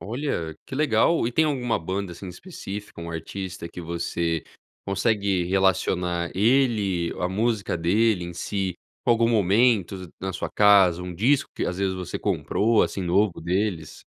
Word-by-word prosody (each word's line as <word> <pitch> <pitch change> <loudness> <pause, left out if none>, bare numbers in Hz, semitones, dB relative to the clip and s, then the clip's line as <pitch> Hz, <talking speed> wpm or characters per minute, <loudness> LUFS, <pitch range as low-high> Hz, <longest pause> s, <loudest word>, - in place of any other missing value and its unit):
Olha, 100 - -3
que 130 - -7
legal. 145 +1 +2
E 120 - -2
tem 160 - +3
alguma 130 -6 0
banda, 95 +2 -4
assim, 90 +2 -9
específica, 100 - -8
um 85 0 -6
artista 90 +2 -6
que 85 - -9
você 85 -1 -2 0.4
consegue 100 -2 +1
relacionar 90 -2 +1
ele, 105 -6 +2
a 90 - 0
música 105 0 0
dele 90 +3 +2
em 85 - -7
si, 95 0 -2 0.3
com - - +2
algum 115 0 +3
momento 100 -3 +2
na 95 0 -3
sua 95 - -4
casa, 95 -4 +5
um 90 -1 -6
disco 125 +10 +2
que - - -2
às 90 +1 -3
vezes 95 -1 0
você 90 -2 -5
comprou 110 +1 +1
assim 95 - -2
novo 95 +2 +1
deles? 90 -2 -2
95 Hz, 155 wpm, -25 LUFS, 90-110 Hz, 0.4 s, casa